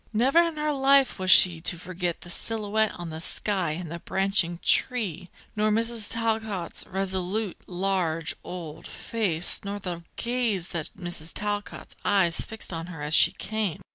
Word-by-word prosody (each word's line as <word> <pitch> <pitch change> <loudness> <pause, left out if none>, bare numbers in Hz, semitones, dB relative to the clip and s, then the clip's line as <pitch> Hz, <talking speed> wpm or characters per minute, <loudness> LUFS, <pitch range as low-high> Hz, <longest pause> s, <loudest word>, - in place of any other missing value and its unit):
Never 260 +9 +4
in 335 -2 -1
her 300 0 0
life 275 -3 +3
was 185 0 -2
she 175 -3 +8
to 175 - +1
forget 180 0 -4
the 175 - -8
silhouette 220 +1 0
on 175 -2 -7
the 160 - -6
sky 185 -1 0
and 170 0 -6
the 170 - -5
branching 190 -2 +1
tree, 190 - +1 0.3
nor 215 0 +2
Mrs. 225 0 +1
Talcott's 220 -6 -2
resolute, 190 +1 -2
large, 180 -3 -1
old, 165 -4 -8
face, 185 -8 -2
nor 200 0 -4
the 180 -4 -6
gaze 235 -7 -1
that 165 -4 -3
Mrs. 175 -3 -4
Talcott's 205 0 -4
eyes 190 -5 +2
fixed 220 -4 -4
on 165 0 -5
her 165 -5 -8
as 150 +1 -2
she - - +8
came. 215 -6 -3
190 Hz, 160 wpm, -26 LUFS, 175-220 Hz, 0.3 s, she